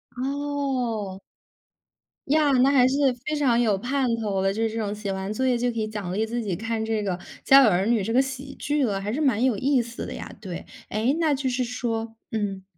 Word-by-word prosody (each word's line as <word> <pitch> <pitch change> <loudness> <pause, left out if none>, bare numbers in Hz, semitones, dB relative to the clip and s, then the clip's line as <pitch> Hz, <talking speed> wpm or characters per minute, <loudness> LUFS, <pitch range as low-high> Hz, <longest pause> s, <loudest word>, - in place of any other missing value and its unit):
哦。 260 -7 -2 1.1
呀， 300 0 +3
那 260 0 +5
还 255 -3 +5
是 260 - 0 0.3
非 305 - -1
常 260 -6 +3
有 220 -5 +2
盼 260 +5 0
头 205 -4 -1
了， 195 0 +1
就 220 - -3
是 225 - +1
这 220 - -5
种 205 -2 -2
写 210 -1 -4
完 190 +2 -3
作 260 +4 0
业 250 -1 +3
就 245 +1 0
可 230 - -4
以 215 - -1
奖 205 -4 -5
励 215 +3 0
自 235 +1 -2
己 195 -5 -2
看 225 +2 -2
这 220 -1 0
个， 190 -3 -2 0.3
《家 275 0 +8
有 230 - +6
儿 185 0 +2
女》 230 -2 +3
这 225 - -1
个 255 - +5
喜 270 +1 -6
剧 295 0 0
了， 200 -4 -1
还 205 +2 -3
是 260 - -2
蛮 260 -7 +2
有 255 -5 +2
意 265 +3 +2
思 235 0 -6
的 - - -6
呀。 - - -7
对。 185 -5 -7 0.2
诶， 220 +6 +1
那 315 -3 +3
就 270 -1 -1
是 250 0 0
说， 230 -2 -3 0.2
嗯， 200 -3 -2
235 Hz, 250 characters per minute, -25 LUFS, 210-265 Hz, 1.1 s, 家